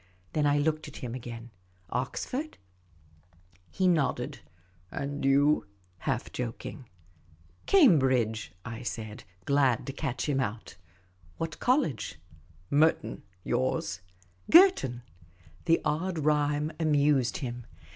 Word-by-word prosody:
Then 150 -1 +2
I 145 0 +3
looked 155 +1 0
at 150 - -11
him 120 -2 -5
again. 120 -1 -7 0.4
"Oxford?" 250 - -3 1.1
He 190 -1 +1
nodded. 165 -6 0 0.3
" 90 0 -34
And 140 +1 -4
you? 140 +1 +3 0.2
" 90 0 -36
half - - -2
joking. 125 +1 -6 0.4
" 85 +1 -30
Cambridge," 130 - +4
I 115 +1 -6
said, 110 -3 -6 0.2
glad 140 -4 +2
to 135 - -5
catch 135 -2 -3
him 140 -2 +1
out. 115 -6 -4 0.3
" 90 -3 -30
What 165 -1 -4
college? 250 - 0 0.2
" 80 +2 -25
" 90 - -31
Merton. 145 -6 +2 0.2
Yours?" 105 -7 -1 0.2
" 90 0 -29
Girton." 335 - +6 0.6
The 165 - +4
odd 170 +4 -1
rhyme 150 0 +1
amused 145 -5 +2
him. 120 -2 -6
135 Hz, 125 wpm, -29 LUFS, 115-150 Hz, 1.1 s, Girton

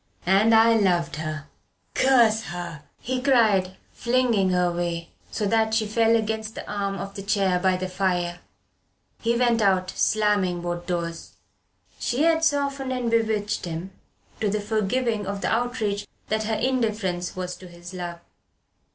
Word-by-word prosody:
"And 200 +5 +5
I 225 +1 +6
loved 175 -7 +1
her 155 -1 -4 0.5
curse 235 -5 +4
her!" 175 -4 -6 0.2
he 255 +1 -3
cried, 215 -9 +3 0.2
flinging 235 -5 +2
her 180 -1 +2
away, 170 -1 -2 0.2
so 215 - -2
that 220 +1 +2
she 220 -1 +2
fell 225 +2 +3
against 220 0 -2
the - - -7
arm 200 -1 -2
of 195 0 -6
the 200 - -6
chair 195 -3 +1
by 185 0 +2
the 185 0 -3
fire. 180 -2 -1 0.8
He 235 +1 +1
went 240 -2 +2
out, 190 -2 +2
slamming 205 -5 +1
both 175 0 -4
doors. 170 -2 -4 0.7
She 255 +5 0
had 325 0 +3
softened 280 -3 0
and 250 -2 -1
bewitched 220 -3 0
him 170 +2 -5 0.5
to 210 - +1
the 210 +1 0
forgiving 215 +1 -1
of 200 0 -3
the - - 0
outrage 225 -4 -1 0.2
that 220 0 0
her 220 0 0
indifference 215 -7 -1
was 180 -1 -4
to 185 - -12
his 175 +1 -11
love. 175 -2 -6
205 Hz, 155 wpm, -24 LUFS, 180-230 Hz, 0.8 s, I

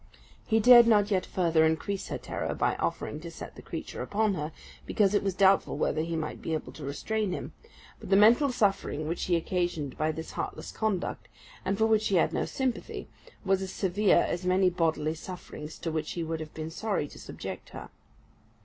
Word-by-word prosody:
He 225 -1 +3
dared 240 +1 +9
not 210 -2 +4
yet 185 -2 +1
further 165 -3 +2
increase 160 +5 0
her - - -3
terror - - -4
by - - +1
offering - - -2
to - - -8
set - - -9
the - - -10
creature - - -6
upon 215 0 +1
her, 155 -3 -3 0.4
because 205 -2 +2
it 205 - +3
was 195 -2 -1
doubtful 195 -5 +4
whether 155 0 0
he 165 +1 -2
might 155 -1 -4
be 160 - -1
able 155 - -5
to 155 - -10
restrain 205 +9 -2
him; - - -5 0.5
but - - -10
the 195 - +5
mental 235 +7 +6
suffering 195 -9 0
which 170 +2 -2
he 175 - +2
occasioned 170 -5 -2
by 155 +1 +2
this 160 +1 -7
heartless - - -5
conduct, 210 -5 -2 0.4
and 195 - -1
for 220 - +3
which 220 -1 +3
he 195 - +1
had 170 - +3
no - - 0
sympathy, 260 -3 -3 0.4
was 195 0 +2
as 190 - -4
severe 195 -1 +3
as 175 - -3
many 185 0 +3
bodily 160 -3 0
sufferings 160 -2 -8
to 165 - -3
which 155 -1 -2
he 170 - -3
would 160 0 -3
have 155 -1 -8
been 160 0 -5
sorry 195 -4 -1
to - - -13
subject - - -7
her. - - -9
180 Hz, 205 wpm, -29 LUFS, 160-205 Hz, 0.5 s, dared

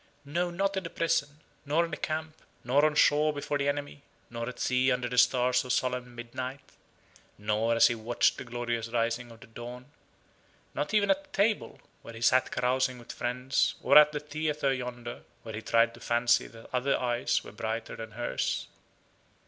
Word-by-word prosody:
No, 175 +5 -1
not 195 +3 -1
in 190 - -2
the 165 - -5
prison; 150 -3 -1 0.2
nor 155 +4 +2
in 165 - -9
the - - -2
camp; 155 0 -3 0.3
nor 135 +4 +3
on 155 -1 +2
shore 150 +1 +4
before 145 0 -3
the 140 0 +1
enemy; 145 0 -4 0.3
nor 115 +1 -4
at 125 - -10
sea 130 +1 +2
under 125 -1 0
the 125 +1 -4
stars 125 0 +3
of 125 - -4
solemn 125 -1 -1
midnight; 125 +3 -7 0.7
nor 105 +2 0
as 115 - +6
he - - +4
watched 115 +1 +1
the - - -5
glorious 120 -1 -3
rising 115 +1 -1
of 115 -1 -14
the - - -11
dawn: 120 +2 -9 0.9
not 150 - -2
even 205 +3 +4
at 295 0 0
the - - -30
table, 215 -3 0 0.2
where 115 - -10
he 115 - -9
sat 130 +2 +4
carousing 130 +1 0
with 120 - -10
friends, 125 +2 0
or - - +4
at 150 0 +9
the 150 - -3
theatre 150 -1 -1
yonder, 120 -2 -6 0.2
where 110 - -7
he 105 - -5
tried 115 +1 +3
to 120 - -13
fancy 120 0 +2
that 115 0 -14
other 130 +2 +2
eyes 120 -1 0
were - - -10
brighter 110 +2 -4
than 115 0 -7
hers. 120 +2 -2
125 Hz, 190 wpm, -29 LUFS, 120-145 Hz, 0.9 s, at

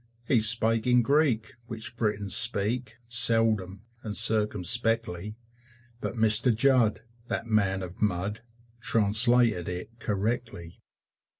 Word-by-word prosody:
He 125 - +2
spake 115 +1 +2
in 125 -1 +3
Greek, 130 -5 0
which 115 0 -7
Britons 105 -4 -1
speak 115 +1 0
Seldom, 115 -5 +2 0.2
and 105 -2 -4
circumspectly; 105 -2 0 0.6
But - - -5
Mr. 110 +2 +3
Judd, 125 -2 +1 0.3
that - - -4
man 100 -4 -1
of 90 0 -11
mud, 105 +1 -2 0.4
Translated 115 -3 +2
it 90 +6 -8
correctly. 105 -3 -5
110 Hz, 105 wpm, -26 LUFS, 100-115 Hz, 0.6 s, in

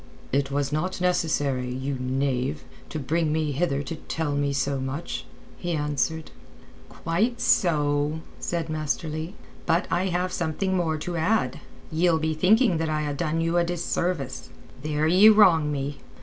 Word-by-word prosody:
"It 140 +1 +1
was 140 0 -1
not 175 +6 -1
necessary, 145 -8 0
you 130 +2 -3
knave, 130 - -1 0.3
to - - -4
bring 155 +3 0
me 155 -1 0
hither 145 -1 0
to 165 - -5
tell 160 -1 -3
me 145 0 0
so 140 0 0
much." 130 - -4 0.3
he 175 -1 -2
answered. 150 +1 -1 0.6
"Quite 215 +9 -1
so," 150 -6 +2 0.2
said 170 -2 -2
Master 155 +1 -2
Leigh. 155 +4 -5 0.3
"But 165 +1 +2
I 185 +2 +1
have 180 0 -1
something 175 +3 -1
more 165 -3 0
to 170 +3 -4
add. 160 - +1 0.3
Ye'll 165 +1 +3
be 160 0 0
thinking 190 +4 +4
that 160 -1 -1
I 155 0 0
ha' 145 -1 -2
done 165 +1 -1
you 165 +1 +1
a 175 - +4
disservice. 170 -4 -2 0.3
There 150 +1 0
ye 185 +7 +7
wrong 180 -8 +5
me. 140 0 -3
155 Hz, 160 wpm, -25 LUFS, 145-175 Hz, 0.6 s, ye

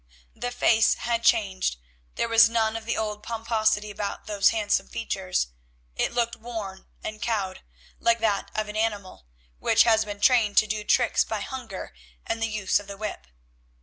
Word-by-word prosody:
The 245 - -3
face 225 -2 +3
had 235 0 -1
changed; 195 - +2 0.4
there - - 0
was 230 0 +6
none 225 -1 +1
of 225 0 -6
the 235 - 0
old 210 -1 -3
pomposity 220 -2 0
about 205 0 -5
those 205 -1 +3
handsome 215 -2 0
features; 185 - -2 0.5
it - - 0
looked 235 -1 0
worn 220 -5 -7 0.2
and 215 0 -6
cowed, 205 -5 -2 0.4
like 235 0 +3
that 215 -3 0
of 215 0 -1
an 210 - -7
animal 200 - -3 0.3
which - - +5
has 225 -1 +4
been 205 -1 -7
trained 225 -3 +3
to - - +7
do 215 0 -3
tricks 240 +3 +3
by 220 -2 -4
hunger 235 - -7 0.3
and 225 - -3
the 225 - +1
use 210 -4 +1
of 205 - -12
the 200 0 -8
whip. 200 - -6
215 Hz, 175 wpm, -26 LUFS, 205-230 Hz, 0.5 s, to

